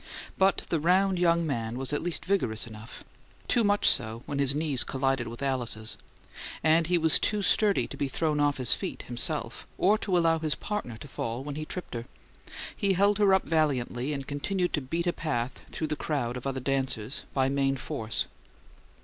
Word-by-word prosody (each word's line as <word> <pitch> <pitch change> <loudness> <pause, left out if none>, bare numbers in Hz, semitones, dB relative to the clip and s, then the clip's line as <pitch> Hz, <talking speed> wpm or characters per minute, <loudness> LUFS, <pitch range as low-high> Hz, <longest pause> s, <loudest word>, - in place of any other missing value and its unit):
But 190 0 +3
the 165 - +2
round 185 +3 +3
young 170 -1 +3
man 115 -5 -2
was 135 +2 -2
at 145 - 0
least 175 0 -3
vigorous 150 - 0
enough 110 -1 -11 0.4
too 235 - +3
much 205 0 +3
so, 115 -1 +1
when 140 -1 -3
his 140 0 +4
knees 145 -5 +3
collided 135 -2 0
with 120 +4 -7
Alice's 120 -5 -1 0.7
and 160 +1 +4
he 175 0 +3
was 160 -1 +4
too 210 -2 0
sturdy 205 +1 +3
to - - -8
be 140 - -1
thrown 150 +2 0
off 145 -1 +2
his 130 -3 +3
feet, - - -4
himself, 120 -1 -3
or 210 +4 +3
to 185 -4 +1
allow 165 -1 +3
his 155 -1 0
partner 205 - -4
to 145 - -10
fall 120 -1 -4
when 145 0 -5
he 155 +2 -5
tripped 180 +3 -6
her. 120 -1 -4 0.7
He 200 -1 +1
held 200 +2 +3
her 205 -2 +5
up 190 0 +4
valiantly, 140 -4 0
and 140 -2 -4
continued 175 +6 -1
to 150 - +1
beat 165 +6 -2
a 175 - +1
path 130 -6 -2
through 160 - -3
the 155 - -2
crowd 140 -6 -2
of 125 +2 -5
other 135 -1 -2
dancers 130 -3 -1
by 130 -1 +3
main 135 0 +1
force. 110 -3 -3
145 Hz, 195 wpm, -28 LUFS, 125-175 Hz, 0.7 s, her